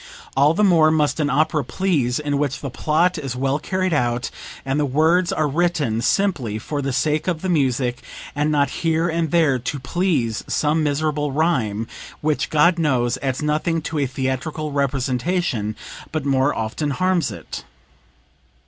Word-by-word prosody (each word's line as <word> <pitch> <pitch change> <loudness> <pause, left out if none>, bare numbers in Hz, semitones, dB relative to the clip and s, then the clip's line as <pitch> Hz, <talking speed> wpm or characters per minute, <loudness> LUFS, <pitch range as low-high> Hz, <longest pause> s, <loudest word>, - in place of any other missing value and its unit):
All 145 +4 +4
the 210 - +2
more 165 -5 +5
must 155 0 +1
an 150 -1 +1
opera 150 +1 +2
please 140 -5 0
in 145 -1 -1
which 145 -2 -1
the 140 - -5
plot 160 +6 +1
is 135 -4 -4
well 135 +3 0
carried 185 +2 -1
out, 120 -3 0 0.3
and 135 +2 0
the 150 - +2
words 160 +6 +3
are 155 - +1
written 150 -7 0
simply 140 - 0
for 145 +6 -4
the 135 0 -2
sake 150 +5 0
of 170 -2 -1
the 185 - -1
music 130 -5 +1 0.3
and 150 +1 +1
not 145 -1 +2
here 165 0 +1
and 165 -1 0
there 150 -5 +3
to 125 +4 -3
please 135 - -1
some 155 +2 +1
miserable 150 0 0
rhyme, 125 -9 0 0.3
which, 155 0 0
God 170 +3 +4
knows, 125 -6 +1
adds 135 +1 -2
nothing 155 +2 0
to 160 -1 -3
a 140 - +1
theatrical 130 +4 -3
representation 135 - -1 0.4
but 155 -3 -2
more 135 0 +2
often 115 +7 -2
harms 180 +3 +1
it. - - -8
150 Hz, 165 wpm, -21 LUFS, 130-160 Hz, 0.4 s, more